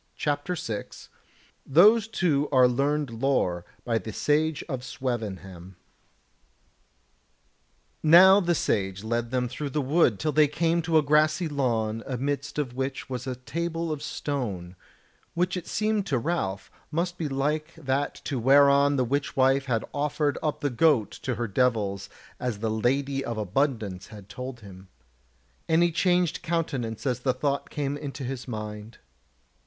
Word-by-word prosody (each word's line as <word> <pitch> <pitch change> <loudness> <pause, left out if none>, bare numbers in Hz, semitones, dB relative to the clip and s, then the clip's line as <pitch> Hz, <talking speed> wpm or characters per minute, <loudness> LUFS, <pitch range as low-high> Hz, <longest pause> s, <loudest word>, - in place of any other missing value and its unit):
CHAPTER 145 +4 -1
6 110 -10 -6 0.5
Those 210 +9 +5
Two 160 -10 0
Are 130 -2 +6
Learned 140 +2 0
Lore 90 -11 +1 0.2
by 115 -2 +1
the 110 +2 -7
Sage 150 +6 0
of 130 -6 -4
Swevenham 95 -8 -5 2.3
Now 185 +5 +8
the 175 -3 +1
Sage 95 -7 -1
led 115 +1 -1
them 125 0 0
through 140 +4 -5
the 150 - -2
wood 140 - +2
till 155 - 0
they 150 0 +5
came 165 +3 +1
to 160 -1 +2
a 155 - +4
grassy 155 +3 +3
lawn 115 -6 -1
amidst 140 +2 -3
of 140 -5 -2
which 130 +1 -4
was 125 +1 -4
a 130 - -2
table 165 +5 -3
of 150 -2 -4
stone, 100 -11 -4 0.6
which 180 +2 0
it 180 -2 -5
seemed 215 -2 0
to 140 -7 +1
Ralph 115 - -2 0.2
must 175 +3 -2
be 155 -3 -2
like 150 +4 -1
to - - -15
that 135 +3 -2
whereon 140 +2 +5
the 130 -2 +1
witch 140 +3 -2
wife 135 +1 +3
had 115 -5 -1
offered 145 0 0
up 150 -2 -2
the 145 - 0
goat 125 -3 +3
to 125 - -2
her 120 +1 -2
devils 105 -3 0 0.3
as 125 -4 -2
the 110 +1 -2
Lady 135 +5 0
of 115 -1 -4
Abundance 105 -3 -1
had 105 -3 -12
told 125 0 -7
him; 95 -2 -13 0.8
and 165 +1 +4
he 175 - +2
changed 175 0 +1
countenance 145 -10 -2
as 125 -2 0
the 130 0 +1
thought 140 +1 -1
came 145 -1 -2
into 140 -2 -6
his 130 0 -5
mind. 105 -1 -6
135 Hz, 155 wpm, -26 LUFS, 115-155 Hz, 2.3 s, Now